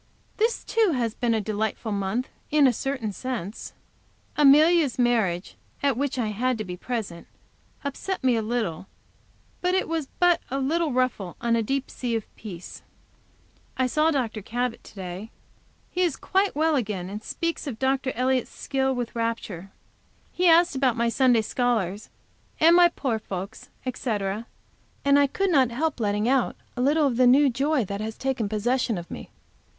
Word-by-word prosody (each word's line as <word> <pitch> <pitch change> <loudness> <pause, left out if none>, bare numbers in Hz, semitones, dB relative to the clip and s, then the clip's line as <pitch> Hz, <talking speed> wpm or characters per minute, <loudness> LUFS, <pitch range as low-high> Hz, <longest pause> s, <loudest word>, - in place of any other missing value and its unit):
This, 455 +2 +1
too, 440 -7 +2
has 235 -3 -1
been 235 -1 0
a - - +1
delightful 215 +1 -2
month 200 +5 -1 0.2
in 300 -1 +4
a 255 - +5
certain 255 -3 -3
sense. 225 -2 -5 0.6
Amelia's 300 0 +5
marriage, 220 -8 +1 0.3
at 280 -3 +3
which 275 +1 -2
I 230 -4 0
had 245 +4 0
to 215 - -3
be 180 -3 -6
present, 195 -4 -5 0.6
upset 285 +6 -4
me 255 -2 +4
a 225 - +1
little, 215 -7 -2 0.7
but 360 +1 +1
it 380 - +1
was 320 -4 -2
but 355 -1 +4
a 270 - -2
little 310 +4 0
ruffle 245 -8 -1
on 235 -1 +1
a 230 - +2
deep 270 +4 -2
sea 240 -2 -2
of 225 - -5
peace. 185 -5 -9 1.0
I 260 - +2
saw 305 +5 +2
Dr. 240 -8 -1
Cabot 240 +3 -3
to - - -14
day. 190 +2 -6 0.6
He 360 - -1
is 340 -6 +2
quite 390 -2 0
well 315 +1 +2
again, 205 -8 -2
and 205 +3 -6
speaks 335 +7 -3
of 245 -6 -4
Dr. 265 +1 0
Elliott's 255 +1 +1
skill 265 -1 -1
with 245 -1 -4
rapture. 225 -5 -3 0.6
He 360 0 +1
asked 340 -1 +5
about 260 -3 +2
my 235 0 +2
Sunday 245 -1 +4
scholars 215 -5 -1 0.5
and 330 +2 +6
my 350 0 +7
poor 260 -9 -2
folks, 195 +1 -7 0.2
etc., 215 -4 -2 0.6
and 280 0 +5
I 285 - +4
could 390 +7 0
not 265 -6 +4
help 290 +4 -2
letting 210 0 0
out 260 -1 +2 0.2
a 250 - -2
little 295 +4 +3
of 250 -4 0
the 250 -1 +5
new 270 +2 +6
joy 275 0 +1
that 200 +2 -4
has 220 0 -5
taken 260 -6 -1
possession 230 +1 0
of 170 0 -8
me. - - -8
250 Hz, 175 wpm, -25 LUFS, 215-280 Hz, 1.0 s, my